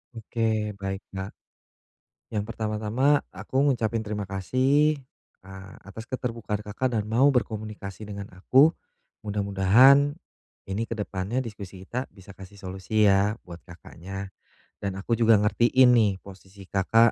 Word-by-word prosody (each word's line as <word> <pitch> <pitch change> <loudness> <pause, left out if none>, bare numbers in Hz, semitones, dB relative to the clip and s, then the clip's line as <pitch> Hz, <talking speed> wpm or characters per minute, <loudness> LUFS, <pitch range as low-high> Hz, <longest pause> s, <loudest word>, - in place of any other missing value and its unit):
Oke. 110 -2 -1
Baik, 95 0 -4
Kak. 95 +1 -5 1.0
Yang 105 -1 -1
pertama-tama 110 +6 +1
aku 135 +1 -2
ngucapin 115 -2 -1
terima 105 -1 -4
kasih, 130 - +2 0.5
eee, 95 0 -11
atas 110 +3 -10
keterbukaan 115 -5 -3
Kakak 115 +5 -2
dan 105 - -2
mau 125 +6 +4
berkomunikasi 110 -5 -3
dengan 100 -1 -6
aku. 135 - +4 0.5
Mudah-mudahan 105 - +4 0.5
ini 95 +3 -2
ke 115 - -4
depannya 100 +4 -3
diskusi 100 -6 -7
kita 125 +5 -4
bisa 95 0 -15
kasih 95 +1 -13
solusi, 95 +3 0
ya, 100 +3 +3
buat 85 -1 -10
Kakaknya. 95 +2 -9 0.5
Dan 100 -2 -3
aku 110 +4 -2
juga 115 -1 +6
ngertiin 115 -1 +3
posisi 95 0 -13
Kakak, 105 +5 +3
105 Hz, 125 wpm, -26 LUFS, 95-115 Hz, 1.0 s, juga